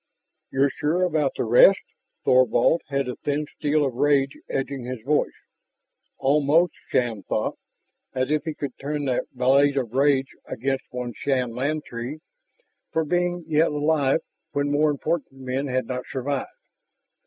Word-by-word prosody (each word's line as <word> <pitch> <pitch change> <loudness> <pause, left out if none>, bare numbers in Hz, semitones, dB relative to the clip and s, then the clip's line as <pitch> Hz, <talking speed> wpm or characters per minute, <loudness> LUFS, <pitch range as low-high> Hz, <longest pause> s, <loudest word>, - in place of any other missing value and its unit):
"You're 135 +1 +2
sure 165 +5 0
about 155 -6 +1
the - - 0
rest?" 125 - +7 0.5
Thorvald 130 +6 +4
had 140 -1 -1
a 125 - -4
thin 150 +1 -1
steel 150 -1 +1
of 135 - -2
rage 135 +1 +2
edging 135 -1 -3
his 125 0 -5
voice. 150 +4 +1 0.8
Almost, 150 +4 +3 0.2
Shann 120 -5 0
thought, - - -2 0.6
as 130 +2 0
if 155 0 0
he 160 -2 -3
could 140 -3 -5
turn 145 +1 -3
that 130 -2 -1
blade 135 +3 +3
of 120 -4 -2
rage 135 0 +2
against 135 +3 -2
one 125 -1 -5
Shann 130 -4 0
Lantee 135 0 -3 0.7
for 160 0 0
being 175 +2 0
yet 160 +1 +3
alive 150 -2 +1 0.3
when 145 0 0
more 150 +1 +3
important 150 +1 -2
men 130 +2 -2
had 130 -1 -1
not 125 +1 -5
survived. 140 - -3
140 Hz, 145 wpm, -24 LUFS, 130-150 Hz, 0.8 s, rest